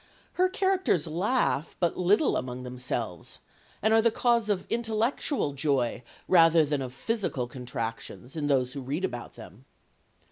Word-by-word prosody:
Her 370 +1 +2
characters 380 - +1
laugh 170 - 0
but 175 -2 +1
little 200 - +3
among 125 0 -4
themselves, 125 -7 -4 0.5
and 220 +1 +4
are 225 - +6
the 230 - +4
cause 235 -1 +1
of 200 -3 0
intellectual 230 - -1
joy 135 -5 0 0.3
rather 165 -3 +6
than 145 -1 -1
of 130 -2 -5
physical 195 - -2
contractions 120 +1 -6
in 150 -2 -2
those 130 -3 +1
who 140 - -5
read 145 +8 -2
about 120 -8 -6
them. - - -13
155 Hz, 145 wpm, -28 LUFS, -, 0.5 s, are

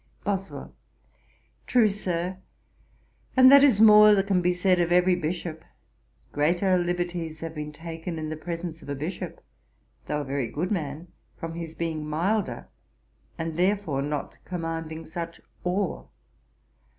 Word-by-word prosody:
BOSWELL. 190 -8 -4 0.9
'True, 235 -3 +5
Sir; 185 -3 -2 1.0
and 260 0 +9
that 280 0 +9
is 255 -8 +5
more 210 -1 +8
than 195 -1 +1
can 195 -2 +2
be 180 +1 +2
said 180 0 +2
of 175 0 +1
every 180 +1 +5
Bishop. 170 -1 -3 0.7
Greater 175 +6 +2
liberties 175 -2 -3
have 165 -1 -5
been 150 -1 -5
taken 165 +2 -6
in 155 -1 -4
the 155 - -3
presence 165 0 -6
of - - -12
a 140 - -2
Bishop, 155 +7 -5 0.7
though 150 0 -1
a - - -6
very 135 -2 -2
good 155 - -3
man, 160 -2 -3 0.3
from 165 0 -5
his 165 -1 -6
being 160 -2 -3
milder, 195 +8 -1 0.7
and 165 -1 -4
therefore 180 -6 +1
not 145 0 -4
commanding 165 -2 -5
such 170 +1 -6 0.2
awe. 185 +1 -1
170 Hz, 140 wpm, -26 LUFS, 155-185 Hz, 1.0 s, and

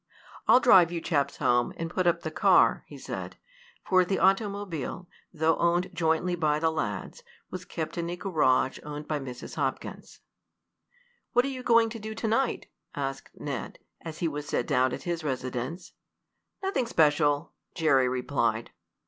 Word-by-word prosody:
"I'll 250 - +7
drive 185 -9 +6
you 170 - -2
chaps 145 -4 -1
home, 120 0 +2
and 165 - -3
put 185 0 0
up 170 0 +2
the 160 - -4
car," - - +4
he - - -11
said, - - -6 0.5
for 185 -1 +4
the 190 +2 -1
automobile, 195 - 0 0.2
though 160 -1 +1
owned 175 +1 +1
jointly 165 +2 +1
by 155 -3 +1
the 160 +1 +1
lads, 160 - -4 0.3
was 185 0 -6
kept 165 0 -5
in 170 0 -2
a 175 - -3
garage 150 -8 +1
owned 150 0 -7
by 150 -1 -1
Mrs. 125 -3 -8
Hopkins. - - -4 1.1
"What 245 +1 +4
are - - -1
you 260 -2 -5
going 230 -2 +4
to 230 - -6
do 220 +1 -6
to 225 - -3
night?" 240 +4 0 0.3
asked 135 -1 -4
Ned, - - -5 0.3
as 160 -1 -7
he 170 - 0
was 150 -1 -5
set 120 - -1
down 130 0 +2
at - - -5
his 170 -2 -3
residence. 130 +4 -4 0.7
"Nothing 285 -11 0
special," 150 -4 +2 0.2
Jerry 135 -6 +3
replied. 120 -3 -1
165 Hz, 165 wpm, -28 LUFS, 145-185 Hz, 1.1 s, I'll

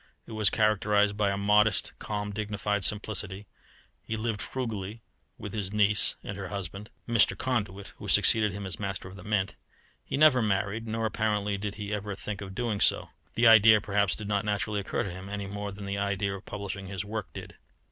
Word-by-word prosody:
It - - -12
was 110 -3 +4
characterized 105 -1 +2
by 105 -1 +2
a 100 - -1
modest, 105 0 +3
calm, 105 -1 -3
dignified 105 -1 -2
simplicity. 105 -1 -1 0.6
He 110 - -4
lived 110 -2 -2
frugally 110 -4 -4 0.3
with 105 -2 -7
his 100 -3 -2
niece 105 0 +3
and 100 - -5
her 95 - -4
husband, 100 +1 -6 0.2
Mr. 110 -5 +3
Conduit, 100 -6 -2
who - - -8
succeeded 110 -2 +4
him 100 +1 -6
as 90 -4 -4
Master 100 -3 -3
of 95 - -11
the 95 - -11
Mint. 105 -1 0 0.5
He - - -3
never 145 -4 +6
married, 105 +1 -1
nor 110 0 -1
apparently 105 -1 0
did 100 +1 -4
he 105 0 -5
ever 105 -1 -3
think 105 0 -5
of 100 - -5
so - - -9
doing. 115 -4 -1 0.5
The 115 - +3
idea, 110 -1 +8
perhaps, 100 -1 +1
did 105 - -7
not 105 -1 0
naturally 105 0 -1
occur 100 - -2
to 95 - -4
him, 95 +2 -8
any 100 0 -4
more 100 +1 -5
than 100 +1 -8
the 100 0 -2
idea 100 0 -1
of 100 +1 -8
publishing 100 -1 -5
his 95 0 -4
work 105 -2 -5
did. - - -9
105 Hz, 200 wpm, -28 LUFS, 100-105 Hz, 0.6 s, idea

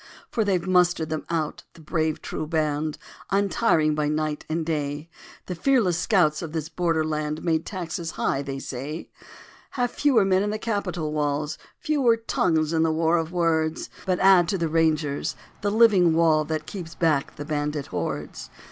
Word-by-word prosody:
For 225 - +1
they've 190 -4 0
mustered 180 -3 +2
them 155 -1 -4
out, 160 -3 -2
the - - -17
brave 155 -1 -1
true 155 - -4
band, 155 -1 -1 0.3
Untiring 195 -5 +2
by 150 -1 0
night 150 0 -2
and 160 0 -1
day. 150 0 -3 0.3
The 180 - -4
fearless 215 -2 +2
scouts 170 -5 +2
of 160 -3 -6
this 160 -1 -3
border 165 -1 0
land 155 0 -2
Made 160 -2 +2
the - - -6
taxes 170 -3 -4
high, 135 - 0
they 140 -1 -5
say. 140 +4 -6 0.7
Have 245 -1 +1
fewer 260 -9 +3
men 190 0 +3
in 205 - 0
the 215 - -2
capitol 180 -8 -2
walls, 150 0 -1 0.2
Fewer 280 -8 +2
tongues 160 -8 0
in 160 - +2
the 160 0 +3
war 165 +1 +2
of 165 0 -2
words, 160 -2 0 0.2
But 185 -1 +2
add 190 -3 +6
to 195 - 0
the 170 -2 0
Rangers, 155 -3 +1 0.3
the 205 - 0
living 200 -6 +5
wall 160 -2 +3
That 155 0 -3
keeps 170 -2 -7
back 155 -5 +1
the 145 - -6
bandit 150 -1 -2
hordes. - - -4
160 Hz, 175 wpm, -25 LUFS, 155-185 Hz, 0.7 s, add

